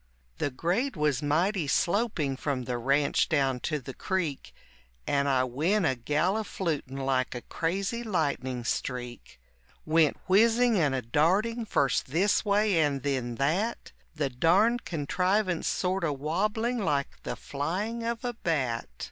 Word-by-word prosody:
The 145 - 0
grade 180 - -1
was 150 -4 +1
mighty 165 +4 +1
sloping 170 - +1
from 135 -1 -2
the 120 0 -3
ranch 140 +3 +2
down 135 -4 +1
to 155 +4 -2
the 135 0 -8
creek 170 -6 -3 0.5
And 140 0 +1
I 130 -2 +3
went 160 - +1
a 135 - +3
galliflutin' 155 - -1
like 130 -2 0
a 120 - -6
crazy 195 +7 -2
lightning 135 - -1
streak, 120 - -4 0.5
Went 155 -1 +3
whizzing 225 +3 +4
and 145 -5 +2
a 130 - -2
darting 195 - +1
first 140 -10 +1
this 175 +9 +2
way 205 -3 +2
and 140 -4 +1
then 130 -4 -1
that, 175 - -1 0.2
The 145 -3 -1
darned 195 - +3
contrivance 180 +4 0
sort 185 0 0
o' 155 -3 +1
wobbling 210 - -1
like 145 -9 -1
the - - -4
flying 190 +11 -3
of 235 +1 -3
a 245 - -1
bat. 135 - -1
155 Hz, 140 wpm, -28 LUFS, 135-200 Hz, 0.5 s, whizzing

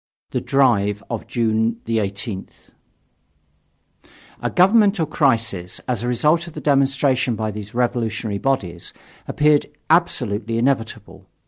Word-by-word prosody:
THE - - -1
DRIVE 105 -7 +2
OF 115 - -4
JUNE 110 -1 0
18TH 100 -2 -4 1.7
A - - -1
governmental 200 -1 +4
crisis, 115 - 0
as 125 -4 -1
a 120 - -3
result 150 +8 +2
of 170 - -10
the - - -6
demonstration 135 -3 +2
by 110 -1 -2
these 105 +2 -8
revolutionary 115 -4 -1
bodies, 95 -11 -2 0.3
appeared 150 -1 +2 0.2
absolutely 115 - +1
inevitable. 115 -4 -2
120 Hz, 110 wpm, -21 LUFS, 105-140 Hz, 1.7 s, governmental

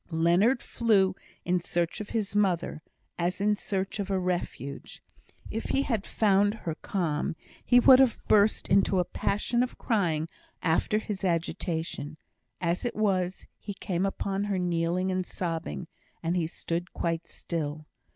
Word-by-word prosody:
Leonard 175 +10 +3
flew 200 -5 +3 0.3
in 180 0 +2
search 175 +2 -1
of 210 - -7
his 210 -3 -2
mother, 180 -6 +1 0.4
as 175 +2 0
in 210 +1 +3
search 195 0 -2
of 200 -1 -2
a 195 - +1
refuge. 175 -6 -4 0.5
If 225 - -3
he 275 - +1
had 225 -7 -1
found 205 0 +3
her 170 -7 -4
calm, 160 -3 -2 0.3
he 245 - +6
would 255 +1 +8
have 260 -4 +4
burst 210 0 +4
into 195 0 +3
a 180 - +2
passion 210 +7 0
of 250 - -2
crying 165 -8 0 0.4
after 165 +5 +2
his 210 -3 -4
agitation; 165 -3 -2 0.4
as 170 +1 0
it 240 - -2
was, 190 -4 0
he 205 -1 -6
came 185 0 -1
upon 195 +1 -2
her 200 -2 -1
kneeling 175 +1 0
and 185 0 0
sobbing, 165 - -4 0.4
and 165 +2 0
he 170 -3 +1
stood 170 +2 -4
quite 165 0 -2
still. 155 -2 -4
185 Hz, 150 wpm, -28 LUFS, 170-205 Hz, 0.5 s, would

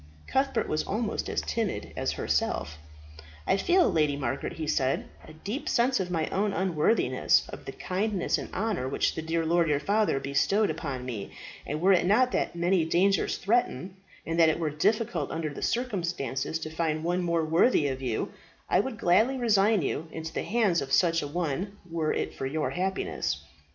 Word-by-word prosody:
Cuthbert 270 +1 0
was 155 - 0
almost 220 +1 -2
as - - -1
timid 225 -4 -3
as - - -1
herself. 75 +1 -1 0.7
"I - - +3
feel, 350 - +3
Lady 150 -3 +2
Margaret," 130 -1 -3
he 160 - -4
said, 135 -3 0 0.2
"a 155 - -11
deep 205 - -5
sense 245 +1 +2
of 185 -2 -2
my 165 -3 -1
own 200 +1 0
unworthiness 185 +3 +2
of - - -9
the - - -5
kindness 195 0 -1
and - - -7
honour 195 - -1
which - - +1
the - - -4
dear 165 +1 -1
lord 170 0 +2
your 145 -1 +2
father 205 -1 +1
bestowed 150 +9 +1
upon 140 -5 -5
me; 115 -6 -5 0.4
and 150 +2 -3
were 195 +2 +5
it 180 -1 +3
not 250 +6 +4
that - - -1
many 175 0 +2
dangers 180 +3 +2
threaten, 195 - 0 0.3
and 165 +1 -2
that 165 -1 +7
it 155 - +1
were 160 -3 -1
difficult 185 -1 0
under 160 -1 -3
the - - -8
circumstances 170 - -1
to 155 -1 -6
find 160 -1 -1
one 175 +2 0
more 170 -2 +1
worthy 160 - +3
of 130 -1 -3
you, 120 -4 -2 0.4
I - - +3
would 230 +2 -2
gladly 215 +9 +3
resign 215 - +3
you 155 +4 -2
into 160 0 -6
the - - -2
hands 210 -7 +1
of 135 -1 -6
such 165 +2 +3
a 145 - -4
one 175 +5 -3
were 165 -2 -1
it - - -2
for 135 - -4
your 150 +2 -1
happiness. 190 +2 -2
170 Hz, 185 wpm, -28 LUFS, 155-205 Hz, 0.7 s, that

